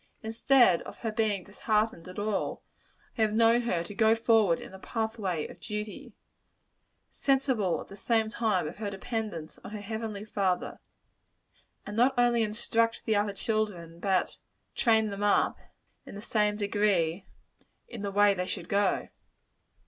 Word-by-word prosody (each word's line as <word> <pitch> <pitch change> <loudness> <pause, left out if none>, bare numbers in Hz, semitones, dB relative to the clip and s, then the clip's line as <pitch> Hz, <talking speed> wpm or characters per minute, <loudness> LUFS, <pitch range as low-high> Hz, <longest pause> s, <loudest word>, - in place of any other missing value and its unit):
Instead 225 -3 +4
of - - -10
her 225 - -2
being 215 -4 0
disheartened 210 -2 -1
at 185 - -10
all, 205 0 -2 0.5
I - - -2
have 215 -1 +2
known 230 +1 +5
her 180 -8 -1
to 190 - -8
go 220 +1 +4
forward 225 -6 +3
in - - -10
the 190 - -11
pathway 220 -7 -2
of - - -13
duty 210 -1 -6 1.0
sensible, 260 -9 +1
at - - -9
the 195 - -11
same 220 +2 +1
time, 220 -7 0
of - - -8
her 210 -1 -3
dependence 200 -5 -5
on - - -7
her 210 0 -6
Heavenly 215 0 -5
Father 195 -4 -1 1.1
and 205 - -6
not 250 +4 +3
only 240 -1 +4
instruct 230 +1 0
the 220 - +2
other 205 0 +1
children, 195 -6 -2
but 190 -1 0 0.4
"train 220 -3 +3
them 200 0 -5
up," 205 0 +2 0.5
in 200 - -8
same 210 -1 +1
good 205 -1 -3
degree, 190 -3 +1 0.6
"in 235 -4 -8
the 200 - -2
way 205 0 +4
they 180 -1 -3
should 180 -3 -5
go." 200 -1 +1
210 Hz, 155 wpm, -29 LUFS, 195-225 Hz, 1.1 s, known